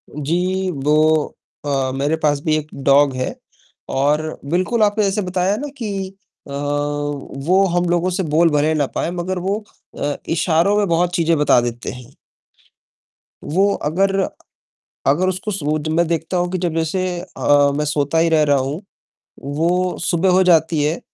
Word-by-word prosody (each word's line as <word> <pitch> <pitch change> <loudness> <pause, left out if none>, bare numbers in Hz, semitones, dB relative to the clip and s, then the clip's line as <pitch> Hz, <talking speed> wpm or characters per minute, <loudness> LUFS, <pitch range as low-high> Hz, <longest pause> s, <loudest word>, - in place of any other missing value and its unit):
जी, 180 +6 -1
वो 155 +1 +2 0.3
अ, 135 -2 0
मेरे 145 +4 0
पास 150 -2 +1
भी 155 0 +1
एक 150 -1 -4 0.2
डॉग 140 0 +4
है, 130 0 -3 0.5
और 150 +3 0
बिल्कुल 185 +6 +1
आपने 210 +1 +2
जैसे 200 +1 0
बताया 185 +1 0
ना 290 - -4
कि 225 -5 -4 0.6
अ, - - -10
वो 145 +4 -1
हम 175 0 +2
लोगों 175 +1 +1
से 185 +1 -1
बोल 165 +1 +3
भले 150 +1 +2
ना 145 -2 +1
पाए 170 - -1
मगर 180 +1 -3
वो 200 +4 -2 0.4
अ, 145 0 -1 0.2
इशारों 170 +4 +2
में 205 -1 +2
बहुत 175 +1 +1
चीज़ें 165 -1 +2
बता 145 -4 +4
देते 120 0 -4
हैं। 125 +1 -12 1.3
वो 195 +6 +2
अगर, 195 +6 0 0.9
अगर 155 +7 +3
उसको 185 +3 -3
सुब 155 -5 -1
जब 155 - -2
मैं 170 +1 +2
देखता 165 +2 -2
हूँ 175 0 -1
कि 185 - -1
जब 175 -3 -2
जैसे 165 +3 -1 0.2
अ, 145 -5 +2
मैं 150 +1 -1
सोता 150 +1 0
ही 165 +1 +3
रह 160 -2 +3
रहा 145 -1 +3
हूँ, 135 +6 -3 0.6
वो 170 +6 0
सुबह 175 +3 +2
हो 185 +1 +5
जाती 160 -3 +3
है, 155 +3 0
160 Hz, 165 wpm, -19 LUFS, 145-185 Hz, 1.3 s, हो